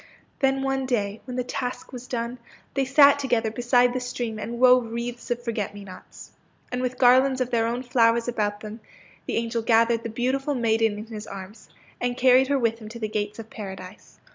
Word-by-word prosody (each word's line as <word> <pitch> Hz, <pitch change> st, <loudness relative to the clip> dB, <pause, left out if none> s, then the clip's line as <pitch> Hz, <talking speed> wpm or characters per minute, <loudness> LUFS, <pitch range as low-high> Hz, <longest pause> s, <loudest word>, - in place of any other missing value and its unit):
Then 270 Hz, -1 st, +1 dB
one 270 Hz, -1 st, -1 dB
day, 210 Hz, -4 st, -1 dB
when 250 Hz, -2 st, -6 dB
the 250 Hz, -, 0 dB
task 250 Hz, +5 st, -5 dB
was 250 Hz, 0 st, -8 dB
done, 240 Hz, 0 st, -4 dB, 0.3 s
they 275 Hz, -1 st, 0 dB
sat 280 Hz, +1 st, +6 dB
together 235 Hz, -5 st, 0 dB
beside 245 Hz, +1 st, +3 dB
the 255 Hz, -, -1 dB
stream 240 Hz, -3 st, -4 dB
and 235 Hz, +2 st, -5 dB
wove 250 Hz, -2 st, +5 dB
wreaths 235 Hz, +1 st, -5 dB
of 240 Hz, 0 st, -2 dB
forget 220 Hz, -4 st, -3 dB
me 205 Hz, -, -9 dB
nots. 185 Hz, -2 st, -12 dB, 0.4 s
And 250 Hz, 0 st, -2 dB
with 255 Hz, 0 st, -2 dB
garlands 260 Hz, +1 st, +5 dB
of 255 Hz, -1 st, -1 dB
their 230 Hz, -1 st, +2 dB
own 240 Hz, +2 st, -2 dB
flowers 235 Hz, -1 st, +2 dB
about 210 Hz, -3 st, -2 dB
them, 215 Hz, +1 st, -8 dB, 0.5 s
the -, -, -2 dB
angel 230 Hz, 0 st, -1 dB
gathered 230 Hz, 0 st, +3 dB
the 230 Hz, -, -5 dB
beautiful 265 Hz, +5 st, -1 dB
maiden 225 Hz, -3 st, +1 dB
in 215 Hz, -, -7 dB
his 220 Hz, -2 st, -8 dB
arms 195 Hz, +2 st, -10 dB, 0.3 s
and 245 Hz, 0 st, -2 dB
carried 260 Hz, +1 st, +5 dB
her 280 Hz, 0 st, +2 dB
with 230 Hz, -3 st, 0 dB
him 215 Hz, -2 st, -9 dB
to 235 Hz, +1 st, -9 dB
the 215 Hz, -, -2 dB
gates 210 Hz, -1 st, -3 dB
of 225 Hz, -1 st, -10 dB
Paradise. 190 Hz, -2 st, -9 dB
235 Hz, 205 wpm, -25 LUFS, 220-255 Hz, 0.5 s, sat